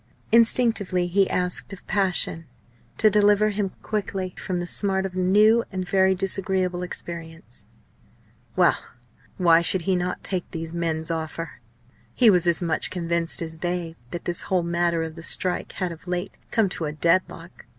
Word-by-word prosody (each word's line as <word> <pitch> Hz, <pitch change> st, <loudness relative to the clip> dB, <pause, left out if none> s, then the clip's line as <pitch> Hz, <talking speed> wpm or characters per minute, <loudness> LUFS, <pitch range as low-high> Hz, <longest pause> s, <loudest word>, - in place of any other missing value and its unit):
Instinctively 225 Hz, -5 st, +3 dB
he 190 Hz, +2 st, +2 dB
asked 180 Hz, +2 st, -1 dB
of 195 Hz, -, -11 dB
passion 185 Hz, -5 st, +1 dB, 0.5 s
to 215 Hz, -1 st, +4 dB
deliver 210 Hz, 0 st, +4 dB
him 200 Hz, -1 st, -1 dB
quickly 195 Hz, -3 st, -3 dB
from 180 Hz, -2 st, -3 dB
the 175 Hz, -, -3 dB
smart 190 Hz, +1 st, +1 dB
of 190 Hz, -, -5 dB
a 185 Hz, -, -3 dB
new 210 Hz, +5 st, +4 dB
and 185 Hz, -2 st, -4 dB
very 190 Hz, 0 st, +3 dB
disagreeable 185 Hz, -1 st, -1 dB
experience. 170 Hz, -1 st, -8 dB, 0.9 s
Well! -, -, +3 dB, 0.6 s
why 170 Hz, -3 st, +5 dB
should 175 Hz, +1 st, +1 dB
he 190 Hz, +2 st, +1 dB
not 180 Hz, 0 st, -3 dB
take 185 Hz, -3 st, -3 dB
these 165 Hz, -1 st, -6 dB
men's 165 Hz, -1 st, -2 dB
offer? 160 Hz, -2 st, -5 dB, 0.5 s
He 235 Hz, -4 st, +6 dB
was 180 Hz, -2 st, +2 dB
as 170 Hz, +1 st, +5 dB
much 165 Hz, -2 st, +1 dB
convinced 170 Hz, -1 st, -1 dB
as 160 Hz, -1 st, -8 dB
they 175 Hz, -1 st, -3 dB
that 170 Hz, +5 st, -7 dB
this 175 Hz, -1 st, -2 dB
whole 185 Hz, -2 st, +2 dB
matter 170 Hz, -1 st, 0 dB
of 160 Hz, -1 st, -6 dB
the 165 Hz, -, -10 dB
strike 180 Hz, +2 st, -1 dB
had 185 Hz, -2 st, -3 dB
of 165 Hz, +2 st, -12 dB
late 180 Hz, +1 st, -3 dB
come 225 Hz, -3 st, +2 dB
to 170 Hz, -, -4 dB
a 150 Hz, -, -3 dB
deadlock. 165 Hz, +1 st, -1 dB
180 Hz, 165 wpm, -24 LUFS, 170-195 Hz, 0.9 s, He